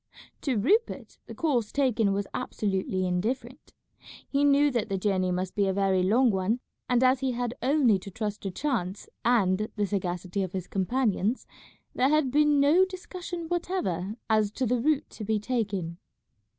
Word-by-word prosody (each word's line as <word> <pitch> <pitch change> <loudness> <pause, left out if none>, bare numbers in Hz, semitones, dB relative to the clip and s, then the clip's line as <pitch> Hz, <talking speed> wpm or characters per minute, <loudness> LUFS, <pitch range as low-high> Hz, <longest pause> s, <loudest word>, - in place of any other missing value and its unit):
To 265 -5 0
Rupert 410 - 0
the - - -8
course 245 -10 0
taken 245 -7 +2
was 200 +1 -1
absolutely 190 -2 -2
indifferent. 235 +9 -3 0.6
He 280 0 +1
knew 285 0 +4
that 235 -3 -1
the 195 - -1
journey 185 -2 0
must 185 +1 -2
be 200 -1 +1
a 190 - +1
very 190 -1 +2
long 230 +7 +4
one, 195 +5 0 0.3
and 250 0 +3
as 255 0 +4
he 260 -1 -1
had 240 0 -2
only 255 -7 +3
to 190 - -9
trust 210 +1 -4
to 195 - -3
chance 200 -4 -3 0.2
and 215 -3 +2
the 210 -1 0
sagacity 185 -1 -2
of 185 -2 -3
his 185 -2 -3
companions, 215 +3 0 0.5
there 260 - +2
had 305 -3 +2
been 295 0 +4
no 300 +7 +5
discussion 365 -2 -6
whatever 220 - -2
as 215 -2 +2
to 260 - -1
the 245 0 +1
route 300 +1 +1
to 220 - -8
be 215 +1 0
taken. 205 -7 -2
220 Hz, 170 wpm, -27 LUFS, 195-270 Hz, 0.6 s, no